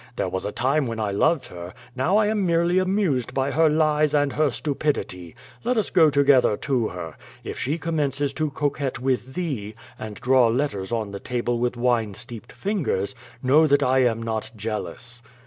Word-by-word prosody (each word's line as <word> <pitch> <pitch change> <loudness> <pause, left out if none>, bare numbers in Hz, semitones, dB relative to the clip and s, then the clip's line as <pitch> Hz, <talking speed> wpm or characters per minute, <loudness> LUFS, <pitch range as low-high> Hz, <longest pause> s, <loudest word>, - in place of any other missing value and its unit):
There 95 - -1
was 95 +1 -3
a 105 - -2
time 135 +4 +1
when 115 -1 -4
I 105 -2 -1
loved 155 +8 +2
her, 90 +2 -9 0.2
now 160 +11 +2
I 215 - +4
am 210 -1 0
merely 170 +1 +2
amused 185 - 0
by 135 +1 0
her 160 +1 +4
lies 155 -1 +2
and 145 -1 +2
her 155 -1 +2
stupidity. 130 - -3 0.3
Let 245 +1 0
us 215 - 0
go 160 -4 +6
together 140 -6 +4
to 125 -6 0
her. 85 -3 -7 0.3
If - - -6
she 145 +5 -1
commences 145 -4 -1
to 155 0 -1
coquette 140 -1 -2
with 130 0 -1
thee, 125 - -3 0.2
and 110 -1 -6
draw 130 0 +4
letters 115 -5 -1
on 110 -3 -2
the 100 - -6
table 120 0 -2
with 120 0 -1
wine 120 -4 +1
steeped 115 +2 -9
fingers, 165 - -2 0.3
know 150 +5 +5
that 145 0 +3
I 130 0 +3
am 115 -3 +1
not 110 -1 -3
jealous." 115 +3 -5
130 Hz, 185 wpm, -24 LUFS, 115-155 Hz, 0.3 s, go